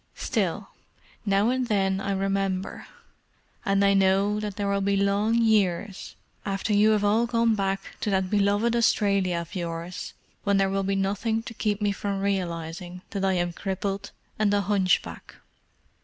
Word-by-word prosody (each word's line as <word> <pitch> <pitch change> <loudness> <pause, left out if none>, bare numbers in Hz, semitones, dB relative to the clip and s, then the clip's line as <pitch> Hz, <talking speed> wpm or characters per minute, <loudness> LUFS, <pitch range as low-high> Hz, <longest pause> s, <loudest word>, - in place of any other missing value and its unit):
Still, - - -2 0.6
now 200 +3 +3
and 255 -1 -1
then 195 -3 +1
I 200 - -2
remember, 195 -1 -2 0.8
and 195 0 +2
I 200 - +4
know 195 +2 +3
that 210 -2 -4
there 205 -1 -2
will 200 0 +1
be 200 0 +1
long 200 +3 +2
years 205 -4 +1 0.3
after 195 +1 -2
you 210 +1 +5
have 215 -1 +2
all 220 +3 +3
gone 230 -1 +2
back 195 -1 -2
to 215 - -2
that 190 -1 +1
beloved 205 +3 +2
Australia 200 -6 +2
of 170 +2 -6
yours 170 -1 -5 0.3
when 200 -1 +2
there 195 0 +2
will 195 0 0
be 195 0 0
nothing 205 +4 -1
to 230 - -8
keep 210 -2 -1
me 205 - +2
from 200 0 -3
realizing 180 -2 -3
that 195 -2 -3
I 190 0 +2
am 175 -1 0
crippled 195 +1 -3 0.3
and 210 -2 +3
a 200 - +2
hunchback. 195 -2 0
200 Hz, 165 wpm, -26 LUFS, 190-210 Hz, 0.8 s, you